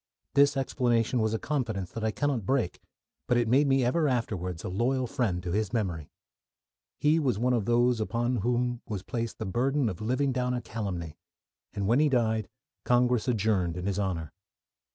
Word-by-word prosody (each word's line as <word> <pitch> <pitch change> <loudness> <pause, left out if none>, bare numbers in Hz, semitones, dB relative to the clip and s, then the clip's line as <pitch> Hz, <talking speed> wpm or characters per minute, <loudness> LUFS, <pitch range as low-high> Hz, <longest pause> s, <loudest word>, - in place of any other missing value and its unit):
This 140 0 +4
explanation 125 -3 +1
was 110 0 +1
a - - 0
confidence 110 -10 -2
that 115 - -5
I 110 - +2
cannot 135 0 -1
break, 115 -4 -1 0.5
but 125 - +3
it 120 -1 +2
made 135 +5 +4
me 135 -2 +3
ever 155 +5 +2
afterwards 95 - -2
a - - -4
loyal 125 +7 0
friend 110 - -1
to 90 - -3
his 105 +1 0
memory. 90 -10 -2 0.9
He 155 +2 +3
was 130 -9 +1
one 125 +3 +1
of 115 -5 0
those 120 0 +3
upon 120 +3 0
whom 120 +2 0
was 100 -3 -4
placed 115 0 -4
the 110 - -4
burden 130 +6 +1
of 90 - -6
living 130 +5 +1
down 125 0 0
a 120 - -2
calumny, 90 -8 -5 0.5
and 100 - -3
when 120 +7 +3
he 150 0 +4
died 110 -5 +1 0.3
Congress 125 -1 +2
adjourned 100 -7 +1
in 90 - -4
his 100 0 -1
honour. 90 -6 -2
120 Hz, 185 wpm, -28 LUFS, 100-125 Hz, 0.9 s, This